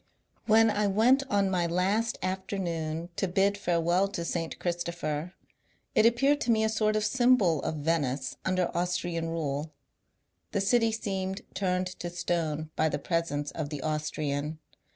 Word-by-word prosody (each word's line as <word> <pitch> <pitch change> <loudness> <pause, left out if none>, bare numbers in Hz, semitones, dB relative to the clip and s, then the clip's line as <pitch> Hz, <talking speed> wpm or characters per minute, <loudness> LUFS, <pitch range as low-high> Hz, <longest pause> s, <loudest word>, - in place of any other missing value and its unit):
When 225 0 +6
I 210 0 +1
went 230 +7 +4
on 200 -2 +2
my 175 -2 +1
last 195 +7 +1
afternoon 175 -4 -3
to 195 - +1
bid 195 +3 +2
farewell 175 0 +1
to 195 -4 -4
St. 165 -1 -3
Christopher, 170 -1 -3 0.6
it 220 - +6
appeared 275 +5 +3
to - - -2
me 220 -1 +3
a 220 - +2
sort 215 -1 +1
of 215 0 +1
symbol 220 - +3
of - - -2
Venice 145 -4 -1
under 185 -2 0
Austrian 175 -1 -1
rule. 155 -2 -2 0.8
The 200 - +1
city 225 +3 +3
seemed 195 -3 -3
turned 185 -1 0
to 175 - -4
stone 160 -3 -2
by 160 - +2
the - - -1
presence 145 -2 -1
of 155 -3 -4
the 145 -3 -5
Austrian. 150 -1 -2
180 Hz, 150 wpm, -29 LUFS, 160-205 Hz, 0.8 s, When